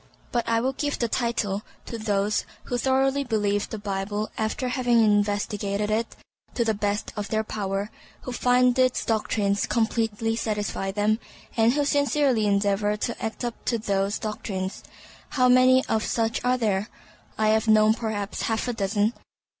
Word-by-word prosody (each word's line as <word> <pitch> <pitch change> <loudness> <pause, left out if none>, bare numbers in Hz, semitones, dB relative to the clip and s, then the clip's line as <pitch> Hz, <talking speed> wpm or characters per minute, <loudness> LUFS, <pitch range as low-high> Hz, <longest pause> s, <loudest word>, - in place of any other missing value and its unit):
But 240 -1 -1
I 230 0 +2
would 260 +2 -1
give 290 -1 -1
the 235 - 0
title 220 -4 -1 0.2
to 230 - -6
those 210 -1 0 0.2
who 245 - -2
thoroughly 270 +2 +2
believe 205 -4 0
the 220 - -4
Bible 205 +1 -3
after 220 +4 -2
having 245 -2 +2
investigated 205 -1 +1
it 225 +2 -1 0.4
to 235 - +1
the 220 - +2
best 205 0 -2
of 205 -2 -3
their 220 +1 0
power, 200 -1 -3 0.3
who 255 - -6
find 250 +1 +3
its 255 -1 +2
doctrines 210 -2 0
completely 225 -1 0
satisfy 210 -3 -2
them, 210 +2 +1 0.4
and 230 +1 +4
who 290 0 +1
sincerely 285 -5 +2
endeavor 205 +1 +1
to 235 +2 -4
act 225 +2 -3
up 240 - -5
to 235 - +1
those 200 -2 0
doctrines. 205 -3 -4 0.5
How 255 -2 +3
many 255 +1 +5
of 220 0 0
such 225 -1 -1
are 250 +1 +2
there? 210 -3 0 0.5
I 215 0 +2
have 220 +1 +2
known 215 0 +6
perhaps 220 -3 -3
half 225 +2 -1
a 245 - -1
dozen. 205 +1 0
220 Hz, 160 wpm, -25 LUFS, 205-240 Hz, 0.5 s, known